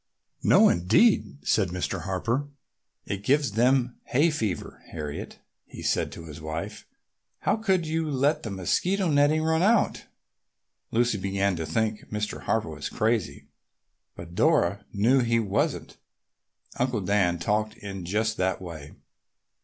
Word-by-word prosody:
"No, - - +6
indeed!" 140 - +2
said 105 -3 +3
Mr. 90 0 -3
Harper. 115 +9 -1 0.6
"It 100 -1 -4
gives 140 +1 +2
them 125 +3 +2
hay 150 +6 +2
fever. 110 - -3
Harriet," 75 -3 -6 0.3
he - - -10
said - - 0
to 85 - -9
his 80 -1 -10
wife, 80 +1 -6 0.5
"how - - +2
could 190 -6 +1
you 160 0 -1
let 145 +3 +1
the 110 - -5
mosquito 175 - 0
netting 145 +2 +3
run 160 0 +2
out?" 220 +3 +2 0.8
Lucy 115 -2 +1
began 100 0 0
to 80 -2 -4
think 110 +6 -2
Mr. 105 0 -3
Harper 110 -6 0
was 75 -1 -5
crazy, 110 - -1 0.7
but 85 0 -10
Dora 100 - +2
knew 115 +7 +3
he 115 -2 +2
wasn't. 100 -4 -1 0.8
Uncle 125 -3 0
Dan 95 -2 +2
talked 105 +5 -1
in 95 -2 -7
just 110 +5 -1
that 95 +1 0
way. 80 -5 -9
110 Hz, 135 wpm, -26 LUFS, 90-140 Hz, 0.8 s, No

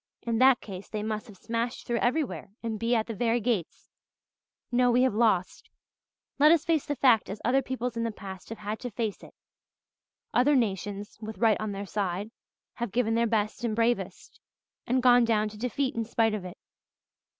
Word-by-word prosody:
"In 230 -1 -1
that 260 -1 +6
case 195 -2 -9
they 215 -1 -3
must 215 +2 -3
have 205 -3 -13
smashed 230 +3 -3
through 235 -1 0
everywhere 245 - -1
and 220 -2 -3
be 235 +1 +1
at 220 -1 +1
the 230 - -5
very 230 +2 +1
gates. 215 -7 -2 0.8
No, 245 0 +3
we 245 +1 +4
have 260 - +2
lost 210 -5 +1 0.7
let 300 +2 +7
us 335 -2 +3
face 320 -4 +1
the 290 - -1
fact 245 -5 +4
as 200 +2 -5
other 265 +3 +3
peoples 250 -2 -4
in 230 - -1
the 230 - 0
past 190 -3 -9
have 225 - -6
had 210 +1 -5
to 245 - -5
face 215 -1 -3
it. - - -14 1.0
Other 280 +4 +4
nations, 205 -3 -2
with 220 -2 -7
right 220 0 +3
on 215 -1 -2
their 200 0 -5
side, 200 +1 -3 0.4
have 235 -4 -4
given 225 +1 +1
their 230 +1 +2
best 215 0 -1
and 225 -3 0
bravest 235 +1 -1 0.5
and 255 +1 +1
gone 245 -1 +6
down 215 -2 +2
to 215 - -12
defeat 255 +3 -1
in 230 - -1
spite 225 -1 +1
of 205 -4 -4
it. 180 - -8
230 Hz, 195 wpm, -28 LUFS, 210-245 Hz, 1.0 s, let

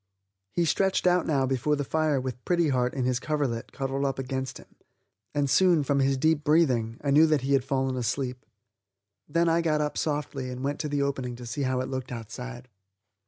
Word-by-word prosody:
He 175 - +1
stretched 190 +5 +1
out 180 0 +3
now 140 -4 +2
before 135 +3 +1
the 145 - -2
fire 155 0 +1
with 125 -1 -5
Pretty 170 -3 +2
Heart 125 -1 0
in 130 -2 -1
his 125 -1 +1
coverlet 130 -5 -2
cuddled 135 0 -2
up 135 -1 0
against 130 0 -3
him, - - -17 0.6
and 145 -1 +2
soon, 175 +1 +4
from 140 0 +1
his 135 0 +2
deep 155 +2 +2
breathing, 130 -8 +2
I 140 - +1
knew 155 +3 +6
that 155 -3 +2
he 135 +2 0
had 135 -2 +3
fallen 135 -1 -1
asleep. 125 +1 -2 0.9
Then 170 +3 +2
I 165 +1 +3
got 155 -2 +1
up 150 -1 -1
softly 145 -4 -2
and 125 +1 -6
went 145 +1 -2
to 150 - -2
the 145 -1 0
opening 130 -3 -2
to 120 0 -9
see 145 +5 -4
how 130 -1 0
it 130 - -3
looked 130 -1 -5
outside. 120 +2 -7
135 Hz, 210 wpm, -27 LUFS, 130-150 Hz, 0.9 s, knew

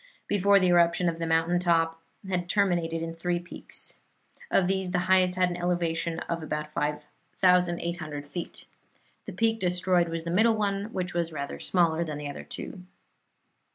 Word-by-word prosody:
Before 200 0 +4
the 185 -1 +2
eruption 170 0 +3
the 165 0 -4
mountain 165 +2 +2
top 165 -2 +1 0.3
had 180 -2 -2
terminated 175 -5 +1
in 165 0 -4
three 175 +1 -1
peaks. 175 0 -1 0.6
Of 190 - +3
these 190 -1 0
the 180 - 0
highest 185 -1 +4
had 180 -1 +2
an 175 - -4
elevation 170 -2 -1
of 170 0 -3
about 150 -1 -4
5,800 170 +1 -1
feet. 170 +4 -6 0.6
The - - -6
peak 225 0 +1
destroyed 180 -1 +1
was 165 0 -4
the 170 - -4
middle 220 +5 +4
one, 200 -1 0
which 185 -5 -4
was 170 -1 -1
rather 140 -2 -5
smaller 170 -2 +2
than 155 -3 -5
the 145 -1 -5
other - - -8
two. 185 - -8
175 Hz, 160 wpm, -27 LUFS, 165-185 Hz, 0.6 s, Before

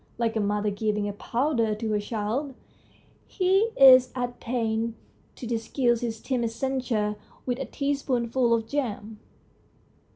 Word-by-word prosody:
Like 230 -1 0
a - - +1
mother 205 0 0
giving 210 0 -1
a 205 - -3
powder 230 0 0
to 220 +1 -4
her 210 - +1
child, 225 +6 -3 0.7
he 385 +3 +2
is 255 -2 +8
at 245 -1 -3
pains 230 -1 -1 0.4
to - - -8
disguise 235 +1 0
his 225 -2 -3
timid 240 -3 -1
censure 230 -4 -1 0.3
with 250 0 -2
a 270 - -3
teaspoonful 260 -4 0
of 225 -1 +1
jam. 220 -6 -3
235 Hz, 135 wpm, -26 LUFS, 220-260 Hz, 0.7 s, is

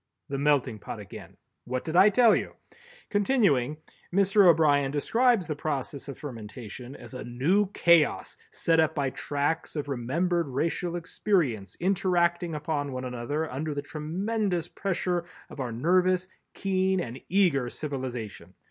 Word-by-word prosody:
_" - - -55 0.3
The 140 0 -2
Melting 140 -6 +1
Pot - - -7
again! - - -11 0.3
What 125 +1 -3
did 160 - -4
I 190 +4 +8
tell 230 +2 +5
you! - - -3 0.6
Continuing, 200 - +2 0.3
Mr. 195 +1 +5
O'Brien 150 -4 +4
describes 225 - +2
the 155 -2 -3
process 145 -2 -4
of 140 - -7
fermentation 120 -1 -8
as - - -12
a 125 - -6
new 160 +13 +1
chaos 170 -3 +3
set 165 -1 +1
up 160 0 +2
by 140 -3 0
tracts 145 +5 -2
of 145 -1 -3
remembered 165 +7 0
racial 165 +6 -1
experience 165 - -1
interacting 175 -2 +1
upon 150 -2 -2
one 130 0 -4
another 125 +6 -3
under 150 +3 -3
the 145 - -3
tremendous 180 +5 -2
pressure 180 -2 -2 0.3
of - - -10
our 125 -3 -3
nervous, 180 +8 +2 0.3
keen 190 -1 +1
and 120 -3 -5
eager 165 -10 +2
civilization. 125 - -6
155 Hz, 145 wpm, -27 LUFS, 135-180 Hz, 0.6 s, I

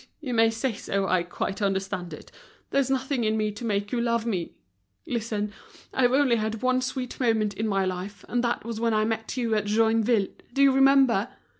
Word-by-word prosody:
Oh! - - -25
you 265 -6 -4
may 225 -1 +5
say 225 +2 -2
so, 200 -1 -2
I 185 -1 +2
quite 185 +4 -4
understand 195 -2 -2
it. 150 - -10 0.4
There's 275 -1 +2
nothing 265 -1 0
in 215 0 +1
me 215 -1 0
to 210 +4 -9
make 205 -2 -1
you 240 - 0
love 235 -1 0
me. 185 -7 -3 0.5
Listen, 215 -3 -2 0.4
I've 245 -2 +3
only 265 -3 +3
had 220 +1 -3
one 255 0 +2
sweet 255 -1 -4
moment 220 -4 +1
in 220 +2 -2
my 195 -2 +1
life, 185 +2 -5
and 245 0 0
that 235 -2 -1
was 230 -1 -4
when 230 -1 +1
I 215 0 +2
met 225 +2 -3
you 235 -3 0
at 210 -1 +1
Joinville, 220 0 +2 0.2
do 275 - +3
you 275 - +6
remember? 270 -5 +4
225 Hz, 205 wpm, -26 LUFS, 205-245 Hz, 0.5 s, you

